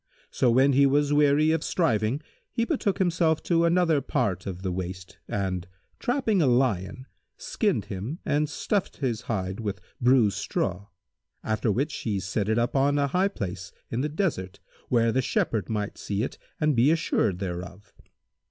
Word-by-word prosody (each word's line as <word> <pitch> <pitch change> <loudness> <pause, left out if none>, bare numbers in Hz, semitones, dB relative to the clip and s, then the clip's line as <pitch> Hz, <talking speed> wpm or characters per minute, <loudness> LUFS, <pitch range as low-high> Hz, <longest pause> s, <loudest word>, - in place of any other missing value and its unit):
So, 125 - +2
when 130 +4 +4
he 140 +1 +5
was 145 +1 +2
weary 150 +1 +4
of 160 -1 0
striving, 120 - +1 0.3
he 230 - 0
betook 235 - 0
himself 165 -4 +1
to 170 -1 +2
another 170 -3 +3
part 120 -13 -1
of 95 -1 -6
the 95 - -1
waste 90 0 -6
and 95 -3 -2 0.3
trapping 240 -7 +1
a 145 - +3
lion, 120 -2 +1 0.3
skinned 215 - -1
him 105 - -5
and 150 +1 +1
stuffed 195 +6 -2
his 120 -6 -2
hide 95 -3 -2
with 100 -3 -3 0.2
bruised 120 -6 +4
straw[FN#160]; 100 0 -2 0.6
after 110 0 0
which 140 +9 -1
he 105 -4 -2
set 95 +2 -2
it 110 - +2
up 120 +3 0
on 140 +2 +3
a 140 -1 +1
high 185 +7 +2
place 95 - -5 0.2
in 115 - -1
the 150 - -1
desert, 150 - -2 0.3
where 115 -2 +3
the 130 - +1
Shepherd 110 -3 -1
might 105 -2 -3
see 100 +1 -2
it - - -5 0.2
and 150 -2 +2
be 120 +5 +4
assured 155 - +1
thereof. 90 +2 -6
125 Hz, 170 wpm, -26 LUFS, 100-150 Hz, 0.6 s, he